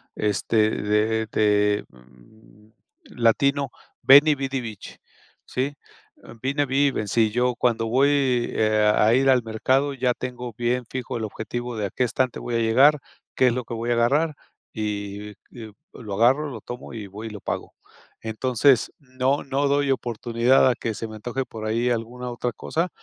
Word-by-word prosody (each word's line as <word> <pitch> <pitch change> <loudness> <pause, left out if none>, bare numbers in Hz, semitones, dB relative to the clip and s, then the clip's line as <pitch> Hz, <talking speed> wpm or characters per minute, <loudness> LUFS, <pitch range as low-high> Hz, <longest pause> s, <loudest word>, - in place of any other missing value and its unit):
este, 105 +1 +1
de 110 +2 0
de, 105 -1 +2
mm, 65 - -21 0.5
latino: 140 +3 +2 0.3
"Veni 145 +3 +7
vidi 135 -1 -3
vici" 110 -5 -8 0.5
¿sí? 135 +3 -3 0.7
Vine, 140 +2 0
vi 140 +2 +2
y - - +1
vencí, 110 -1 +1
yo, 125 +2 +1
cuando 115 -2 0
voy, 130 +5 +3 0.4
eh, 110 -1 +3
a 110 +2 +4
ir 135 +2 +3
al 130 -2 +4
mercado, 130 +6 0
ya 125 -2 0
tengo 125 -1 -6
bien 120 +1 -1
fijo 125 -2 -4
el 115 - -4
objetivo 120 +3 -5
de 105 - -1
a - - -3
qué - - -29
qué - - +2
estante 125 +1 -1
voy 120 - -4
a - - +2
llegar, 130 +7 +4 0.4
qué 130 - +4
es 120 - +2
lo 125 +1 -3
que - - -7
voy 115 +1 -2
a - - +4
agarrar 145 +7 +2 0.4
y 105 -1 -4 0.2
y 110 -3 -10 0.2
lo 105 -5 -8
agarro, 130 +8 +3
lo 120 -5 -7
tomo 120 +3 -9
y 110 -3 -7
voy 105 +4 -8
y - - -6
lo 105 -1 -8
pago. - - -5 0.5
Entonces, 125 +3 +2
no 130 0 -1
no 140 +1 0
doy 140 0 +1
oportunidad 120 +1 +2
a 125 - +1
que 115 - -3
se 115 - -5
me 110 - -9
antoje 120 +5 -4
por 110 -2 -8
ahí 115 +3 0
alguna 120 +1 -3
otra 120 0 -3
cosa, 165 +10 -2
120 Hz, 175 wpm, -24 LUFS, 110-130 Hz, 0.7 s, Veni